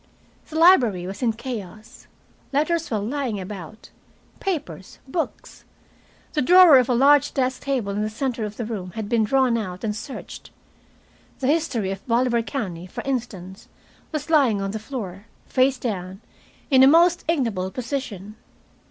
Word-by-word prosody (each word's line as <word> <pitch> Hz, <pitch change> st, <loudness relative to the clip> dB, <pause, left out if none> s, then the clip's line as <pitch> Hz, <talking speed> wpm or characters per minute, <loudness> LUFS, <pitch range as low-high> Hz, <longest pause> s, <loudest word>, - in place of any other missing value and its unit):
The 315 Hz, -, -9 dB
library 250 Hz, -, +5 dB
was 190 Hz, +5 st, -7 dB
in 235 Hz, -3 st, +1 dB
chaos. 220 Hz, -4 st, -8 dB, 0.4 s
Letters 315 Hz, +4 st, 0 dB
were 220 Hz, -, 0 dB
lying 230 Hz, 0 st, -2 dB
about, 190 Hz, +1 st, -9 dB, 0.5 s
papers, 235 Hz, -, -4 dB
books. 325 Hz, +5 st, -5 dB, 0.7 s
The 300 Hz, -, +1 dB
drawer 345 Hz, -1 st, +8 dB
of 250 Hz, -, +1 dB
the 250 Hz, -, +1 dB
large 280 Hz, +3 st, +4 dB
desk 255 Hz, -1 st, 0 dB
table 260 Hz, -8 st, -2 dB
in 205 Hz, +1 st, -2 dB
the 215 Hz, -, -1 dB
center 235 Hz, +1 st, -3 dB
of 210 Hz, 0 st, -5 dB
the 235 Hz, -, -3 dB
room 190 Hz, -6 st, -6 dB
had 220 Hz, -2 st, -4 dB
been 230 Hz, 0 st, +2 dB
drawn 250 Hz, +1 st, +2 dB
out 185 Hz, -4 st, -6 dB
and 210 Hz, -2 st, -2 dB
searched. 265 Hz, +5 st, -8 dB, 0.9 s
"The 265 Hz, -, -4 dB
History 270 Hz, -, 0 dB
of 195 Hz, 0 st, -6 dB
Bolivar 235 Hz, 0 st, +2 dB
County," 185 Hz, -8 st, -5 dB
for -, -, -7 dB
instance, 205 Hz, -8 st, -5 dB, 0.4 s
was 305 Hz, +1 st, -4 dB
lying 265 Hz, -10 st, +4 dB
on 195 Hz, 0 st, -3 dB
the 220 Hz, -, -4 dB
floor, 210 Hz, -4 st, -7 dB, 0.2 s
face 260 Hz, +1 st, +2 dB
down, 190 Hz, -5 st, -5 dB, 0.5 s
in 260 Hz, -1 st, +6 dB
a 265 Hz, -, +8 dB
most 340 Hz, +4 st, +5 dB
ignoble 230 Hz, -, 0 dB
position. 225 Hz, -4 st, -5 dB
235 Hz, 155 wpm, -23 LUFS, 200-275 Hz, 0.9 s, drawer